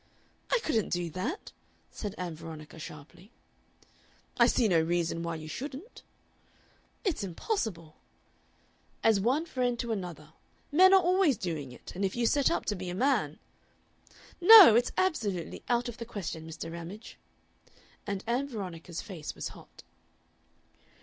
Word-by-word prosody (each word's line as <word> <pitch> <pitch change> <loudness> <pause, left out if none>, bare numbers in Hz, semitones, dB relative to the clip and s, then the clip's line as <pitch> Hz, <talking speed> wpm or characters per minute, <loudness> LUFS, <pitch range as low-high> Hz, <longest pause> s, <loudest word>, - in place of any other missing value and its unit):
"I - - +5
couldn't 225 -9 0
do 175 -2 -2
that," 235 - -4 0.4
said 205 -1 -6
Ann 180 -2 -4
Veronica, 160 0 -10
sharply. 155 +7 -11 1.1
"I - - +7
see 240 - +3
no 170 -5 +3
reason 165 0 -1
why 170 0 -3
you 155 -1 -8
shouldn't." 280 - -7 1.0
"It's 360 - -1
impossible." 175 - -3 1.1
"As 220 -3 +4
one 260 +10 +1
friend 250 -6 -1
to 235 0 -3
another. 180 -6 -6 0.4
Men 370 +5 +7
are 385 - +8
always 360 - +3
doing 160 -8 -4
it, 125 - -11
and 190 - -4
if 190 - -1
you 240 -1 0
set 280 +4 +3
up - - -1
to 210 - -1
be 185 -1 -6
a 175 - -4
man 210 - +1 0.5
" - - -30 0.3
"No, 390 - +11
it's 240 +2 +3
absolutely 220 - -1
out 240 0 +1
of 240 - -7
the 230 - -6
question, 165 -7 -6
Mr. 165 0 -7
Ramage." 170 +6 -9 0.9
And 200 -1 -3
Ann 245 +4 0
Veronica's 180 -7 -6
face 175 -7 -7
was - - -5
hot. - - -15
200 Hz, 150 wpm, -29 LUFS, 170-255 Hz, 1.1 s, No